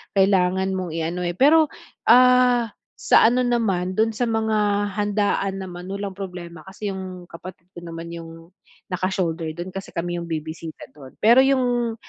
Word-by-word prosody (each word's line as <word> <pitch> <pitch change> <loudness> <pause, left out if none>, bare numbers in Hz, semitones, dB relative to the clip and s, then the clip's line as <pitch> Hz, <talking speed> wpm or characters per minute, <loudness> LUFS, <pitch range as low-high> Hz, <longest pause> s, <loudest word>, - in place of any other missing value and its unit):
kailangan 190 -1 +2
mong 185 -3 -4
iano, 165 +2 -2
eh. 175 - -2
Pero, 310 +5 +5 0.4
ah, 250 -1 +5 0.3
sa - - +5
ano 250 +2 +2
naman 195 -7 0
dun 225 +1 +3
sa 245 - -1
mga 215 -2 +1
handaan 205 -2 0
naman, 180 -1 -8
walang 200 -1 -5
problema 175 -4 -8
kasi 205 +2 -6
yung 185 -2 -8
kapatid 170 +1 -11
ko 175 - -9
naman 165 0 -7
yung 165 +1 -11 0.4
naka 185 +1 -1
shoulder 165 -4 -2
dun 175 +2 -6
kasi 195 - -6
kami 175 0 -2
yung 170 - -7
bibisita 160 0 -6
do'n. 135 -3 -13
Pero 235 +4 +6
'yong 245 -4 +1
190 Hz, 160 wpm, -22 LUFS, 175-220 Hz, 0.4 s, Pero